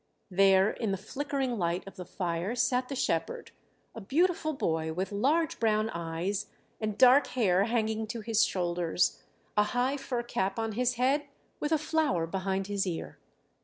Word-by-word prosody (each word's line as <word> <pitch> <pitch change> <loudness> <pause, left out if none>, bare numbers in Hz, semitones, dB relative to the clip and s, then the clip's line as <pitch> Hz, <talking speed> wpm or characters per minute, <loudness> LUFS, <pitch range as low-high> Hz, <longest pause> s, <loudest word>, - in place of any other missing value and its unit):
There 195 +2 +5
in 225 - -3
the 195 - 0
flickering 265 +3 -3
light 170 0 -1
of 195 - -10
the 180 -2 -7
fire 180 +4 -2
sat 250 +1 +1
the 275 - -3
shepherd, 475 - -2 0.4
a 225 - -8
beautiful 315 - +1
boy 160 - -1
with 185 +4 -3
large 290 +10 +1
brown 220 -1 +1
eyes 170 +4 -3 0.3
and 215 -2 -3
dark 260 +3 +6
hair 195 -4 +3
hanging 220 -1 -1
to 230 +1 -5
his 225 +1 +2
shoulders, 175 -3 0 0.3
a 210 - +5 0.2
high 260 +3 +1
fur 245 -3 -3
cap 195 -4 -2
on 225 -1 -1
his 250 +3 0
head 275 +4 +1 0.3
with 295 - -2
a 320 - +4
flower 305 - 0
behind 190 +2 -2
his 200 -1 -1
ear. 160 - -5
215 Hz, 165 wpm, -29 LUFS, 190-255 Hz, 0.4 s, dark